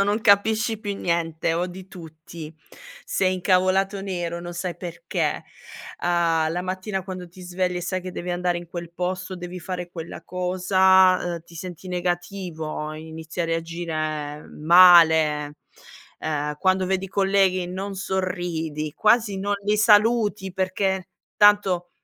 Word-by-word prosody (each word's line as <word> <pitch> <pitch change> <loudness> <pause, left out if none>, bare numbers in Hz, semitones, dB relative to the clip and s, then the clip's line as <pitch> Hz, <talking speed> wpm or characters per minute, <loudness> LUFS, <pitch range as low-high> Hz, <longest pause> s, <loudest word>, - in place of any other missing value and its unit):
quando 195 - +4
non 205 +2 0
capisci 220 +1 +3
più 205 -2 -4
niente 165 -2 -1
o 175 +2 0
di 185 +1 -10
tutti 160 -2 -10 0.5
sei 185 -1 +1
incavolato 185 +2 +1
nero 175 -3 -3
non 175 0 -7
sai 175 0 -4
perché, 175 +6 -3 0.6
uhm, 165 -2 +2
la 175 - -2
mattina 190 +1 -3
quando 185 -1 -7
ti 185 +2 -15
svegli 180 0 -2
e - - -2
sai 185 +1 -3
che 185 0 -6
devi 180 0 -5
andare 175 0 0
in 175 - -10
quel 170 0 -7
posto, 185 +1 -3
devi 180 0 -7
fare 180 0 -5
quella 165 -1 -8
cosa, 185 0 +3 0.2
ehm, 170 - -8
ti 170 - -18
senti 180 +2 -8
negativo, 175 -3 -3
inizi 160 +2 -7
a - - +1
reagire 155 -3 -3
male, 160 -3 +6 0.6
ehm, 150 -1 -2
quando 185 +1 +2
vedi 190 +1 -1
i - - -14
colleghi 190 -2 +2
non 195 +2 -5
sorridi, 175 -5 -3
quasi 215 -2 +2
non 205 +1 -1
li 210 +1 +2
saluti 210 -2 +3
perché 190 0 -1 0.3
tanto, 200 -4 +4
180 Hz, 145 wpm, -24 LUFS, 170-190 Hz, 0.6 s, male